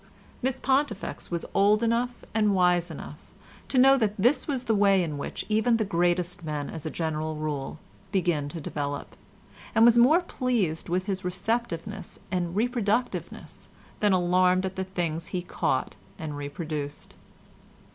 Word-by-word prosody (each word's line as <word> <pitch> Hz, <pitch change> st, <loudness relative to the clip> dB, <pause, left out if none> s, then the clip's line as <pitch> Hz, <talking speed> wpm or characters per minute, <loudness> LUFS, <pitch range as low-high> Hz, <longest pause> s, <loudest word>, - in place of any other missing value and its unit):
Miss 260 Hz, +1 st, -1 dB
Pontifex 265 Hz, -6 st, -1 dB
was 170 Hz, -1 st, -3 dB
old 210 Hz, +3 st, +4 dB
enough 235 Hz, +2 st, 0 dB
and 210 Hz, -2 st, +3 dB
wise 180 Hz, -1 st, +3 dB
enough 150 Hz, -1 st, -8 dB, 0.5 s
to 265 Hz, -, -1 dB
know 270 Hz, +1 st, +7 dB
that 215 Hz, -2 st, 0 dB
this 255 Hz, +8 st, +2 dB
is 265 Hz, -3 st, -1 dB
the 225 Hz, -, +1 dB
way 200 Hz, -2 st, +4 dB
in 155 Hz, -3 st, -3 dB
which -, -, -5 dB
even 220 Hz, +2 st, +3 dB
the 220 Hz, -, 0 dB
greatest 175 Hz, -1 st, 0 dB
men 150 Hz, -2 st, -3 dB
as 160 Hz, -1 st, -5 dB
a -, -, -1 dB
general 155 Hz, -1 st, -2 dB
rule 150 Hz, -1 st, -3 dB, 0.3 s
begin 175 Hz, -7 st, 0 dB
to 165 Hz, -, -6 dB
develop, 145 Hz, -1 st, -4 dB, 0.6 s
and 225 Hz, +1 st, +7 dB
was 240 Hz, 0 st, +6 dB
more 300 Hz, +9 st, +6 dB
pleased 235 Hz, -, -1 dB
with 180 Hz, +2 st, 0 dB
his 195 Hz, -2 st, -3 dB
receptiveness 195 Hz, 0 st, -3 dB
and 175 Hz, -1 st, -1 dB
reproductiveness 235 Hz, +1 st, -1 dB, 0.3 s
than 210 Hz, -1 st, +3 dB
alarmed 185 Hz, 0 st, +3 dB
at 190 Hz, 0 st, -4 dB
the 190 Hz, -1 st, -2 dB
things 170 Hz, -3 st, -3 dB
he 180 Hz, -1 st, -3 dB
caught -, -, -1 dB, 0.2 s
and 155 Hz, -2 st, -5 dB
reproduced. 145 Hz, 0 st, -5 dB
185 Hz, 155 wpm, -27 LUFS, 165-225 Hz, 0.6 s, know